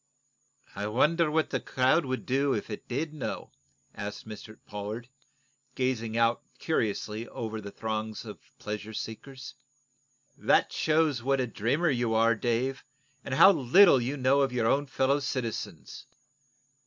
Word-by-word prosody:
"I 100 +1 -3
wonder 150 +9 +2
what 160 +1 0
the - - 0
crowd 130 +6 +2
would 130 0 -3
do, 135 +1 +1
if 105 +1 -5
it 105 - -7
did 150 +5 -3
know?" 150 - -5 0.4
asked 105 0 -6 0.4
Pollard, 105 +4 -6 0.7
gazing 115 -3 -1
out 115 0 +2 0.2
curiously 110 -5 -2
over 110 -1 -5
the 100 - -7
throngs 110 +1 -4
of 105 -6 -9 0.2
pleasure 105 +1 -6
seekers. 125 +4 -7 0.8
"That 145 - +2
shows 155 -5 +2
what 135 +2 +1
a 130 - +1
dreamer 125 +9 0
you 120 -3 0
are, 115 +1 +4
Dave, 120 +4 -1 0.4
and 130 - -3
how 195 - +9
little 155 -1 +6
you 130 +5 -2
know 135 +2 +3
of 135 -2 +1
your 120 -2 0
own 140 +5 +2
fellow 135 +1 +1
citizens. 130 -5 -5
125 Hz, 140 wpm, -28 LUFS, 110-140 Hz, 0.8 s, how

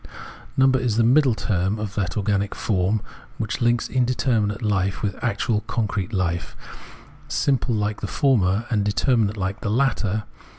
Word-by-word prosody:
Number 130 -1 +4
is 120 -4 0
the 115 - +4
middle 130 +1 +4
term 95 0 -1
of 105 -2 -4
the 100 -4 -1
organic 100 -1 0
form, 100 +1 0 0.4
which 110 +2 -3
hnks 120 -1 +2
indeterminate 120 -5 0
life 95 -3 0
with 100 -2 0
actual 110 -2 0
concrete 105 -3 -2
life, 90 -4 -2 0.7
simple 135 -3 +1
Uke 105 0 -6
the - - -2
former, 110 -7 +2
and 105 -3 +2
determinate 105 0 +1
like 95 +1 -3
the 105 - -2
latter. 110 -4 +1
105 Hz, 145 wpm, -23 LUFS, 100-120 Hz, 0.7 s, Number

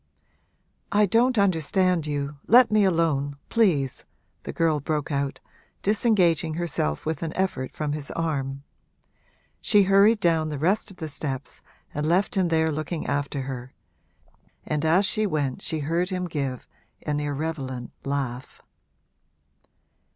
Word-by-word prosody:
'I 210 0 +4
don't 235 +5 +2
understand 185 -2 +2
you 145 0 -3
let 245 +1 +7
me 215 -1 +4
alone, 155 -6 +1
please!' 165 - +1 0.4
the - - -4
girl 160 -2 +1
broke 150 +1 -2
out, 140 -1 -2 0.4
disengaging 185 -7 +2
herself 150 - -2
with 160 0 -2
an 165 -1 -3
effort 185 -9 -1
from 150 -1 -3
his 150 -2 -4
arm. 140 -4 -3 1.0
She 205 -2 +5
hurried 200 +3 +5
down 165 -4 +2
the 150 - -4
rest 185 +10 +1
of 195 - -13
the 160 - -5
steps 145 -2 -5 0.3
and 150 +1 -2
left 185 +6 +2
him 190 -2 +2
there 160 -1 +2
looking 155 +2 -4
after 140 0 -2
her, 130 -1 -7 0.9
and 150 0 -1
as 170 +5 +4
she 215 +2 +1
went 145 -7 -2
she 160 -1 -3
heard 170 +5 0
him 180 -1 -2
give 140 -7 -3 0.4
an 150 -1 -1
irrelevant 145 -4 -4
laugh. 135 -3 -4
160 Hz, 135 wpm, -25 LUFS, 140-185 Hz, 1.0 s, let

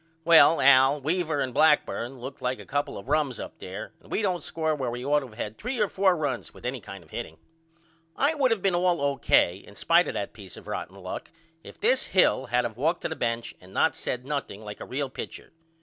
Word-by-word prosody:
Well 165 0 +7
Al 135 +2 +6
Weaver 155 +1 0
and 130 -2 -2
Blackburne 145 -4 +2
looked 130 +2 -8
like 125 +1 -1
a - - -11
couple 145 0 -2
of 100 - -10
rums 145 -3 +1
up - - -8
there - - -7
and - - -19
we 220 - 0
don't 185 -3 0
score 160 -1 -1
where 135 -5 -2
we 120 +2 -5
ought 145 +1 +3
to 135 - -8
of 110 - -16
had 110 -1 -5
3 250 0 -3
or 210 - +3
4 190 -2 +3
runs 145 -4 -3
with - - -12
any 125 0 -3
kind 95 -3 -10
of 75 - -23
hitting. 80 - -6 0.8
I 285 +3 +3
would 275 -5 +2
of 220 -5 0
been 195 -2 +3
all 175 0 +2
O.K. 140 -10 +2
in 100 +1 -16
spite 170 +8 +3
of - - -4
that 100 - -3
peace 100 -4 -12
of - - -12
rotten 95 - -5
luck 95 -1 -7 0.3
if - - -12
this 485 +4 +2
Hill - - +3
had 125 0 +1
of 115 -1 -5
walked 160 +6 0
to - - -2
the 160 - -4
bench 115 -3 -2
and 90 +1 -15
not - - +3
said 125 0 -4
nothing 135 -7 -4
like 105 0 -8
a - - -7
real 140 +2 -2
pitcher. - - -8
140 Hz, 240 wpm, -27 LUFS, 120-165 Hz, 0.8 s, Well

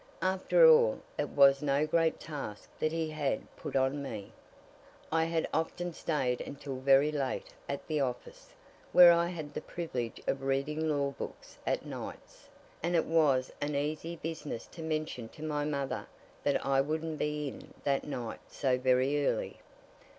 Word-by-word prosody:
After 190 - +5
all, 485 +1 +6 0.2
it - - 0
was 140 -1 +6
no 145 0 +2
great 165 +1 +2
task 140 -10 -6
that 155 - +1
he 160 -1 -2
had 150 -3 -1
put - - -7
on 135 +2 +2
me. 110 -8 -6 0.8
I 160 0 +3
had 165 -1 0
often 175 +2 -1
stayed 135 -7 -1
until 140 -1 -6
very 135 +3 +5
late 140 -3 -3 0.2
at 140 - -3
the 155 -2 -1
office, 125 -2 -5 0.4
where 175 -1 +10
I 170 0 +3
had 160 -4 -6
the - - -4
privilege 130 -9 -4
of 135 - -1
reading 140 +4 0
law 140 -2 +1
books - - -9
at - - 0
nights, - - -8 0.3
and 175 +2 0
it 165 - +3
was 145 -6 +3
an 145 0 -1
easy 155 +4 -2
business 160 -7 -5
to 170 - -9
mention 155 -7 -3
to 150 - -11
my 150 -1 -1
mother 140 -2 -2 0.4
that 145 - +1
I 135 0 +3
wouldn't 155 +2 -2
be 150 0 -1
in - - -9
that 140 -1 +1
night 120 -6 -5
so 130 -3 0
very 130 +3 +2
early. - - -1
150 Hz, 165 wpm, -31 LUFS, 135-160 Hz, 0.8 s, where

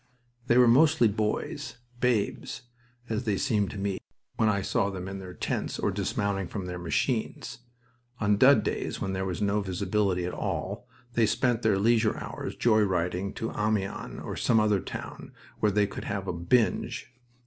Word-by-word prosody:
They 120 - +4
were 125 -1 +7
mostly 145 +1 +5
boys 110 +6 -2 0.2
babes, 120 0 0 0.4
as 115 +2 -2
they 105 -3 +1
seemed 105 -2 +1
to - - -7
me, 100 -1 -2 0.4
when 110 - +3
I 100 -2 +1
saw 100 - +1
them 95 -1 -5
in 95 0 -5
their 90 -1 -9
tents - - -2
or - - 0
dismounting 100 -2 -1
from 95 -1 -5
their 90 0 -5
machines. 110 +10 -2 0.6
On 105 -1 +3
"dud" 130 +6 +6
days, - - -2
when 95 0 -2
there 95 0 -2
was 95 +3 -2
no 105 +1 +1
visibility 95 -1 0
at 90 - -3
all, - - -3 0.3
they 115 -2 +3
spent 120 +1 +1
their 110 -4 +3
leisure 115 +2 +3
hours - - -6
joy 110 -2 +3
riding 90 0 0
to 115 -2 -3
Amiens 105 -2 -2
or - - -5
some 115 -2 +3
other 105 -2 +3
town - - -8 0.3
where 105 - +3
they 105 +1 +3
could 100 - -7
have 100 -1 -3
a - - -1
"binge." 110 +7 0
105 Hz, 175 wpm, -28 LUFS, 95-115 Hz, 0.6 s, were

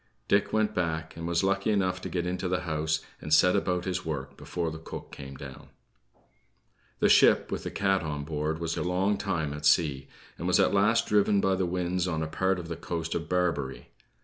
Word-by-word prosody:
Dick 100 -1 +2
went 110 -1 +1
back, 80 -3 -2
and 85 0 -5
was 85 +1 +1
lucky 100 +2 +1
enough 95 -3 +1
to - - -5
get 90 -1 -2
into 90 +1 -2
the 90 0 0
house 80 -1 -1 0.2
and 75 - -7
set 90 +4 +5
about 90 -3 0
his 95 -1 -2
work 70 -4 -5
before 85 -2 -3
the 80 - -7
cook 80 - -9
came 70 -1 -9
down. 70 -1 -10 1.3
The - - +3
ship, - - +5
with - - -2
the - - -4
cat 95 -1 +1
on 75 -3 -4
board, 75 +1 -2
was 85 0 -3
a - - -2
long 95 +3 +1
time 80 -7 -2
at 75 0 -7
sea; 75 -3 +3 0.3
and - - -3
was - - +4
at - - +3
last 105 +3 +3
driven 105 -1 +3
by 95 -1 +2
the 95 -1 0
winds 90 0 -1
on 80 -3 -1
a - - -2
part 95 +4 0
of 85 -2 -6
the 85 -1 -5
coast 85 -1 -4
of 80 -1 -4
Barbary. 85 -7 -1
85 Hz, 215 wpm, -28 LUFS, 80-95 Hz, 1.3 s, set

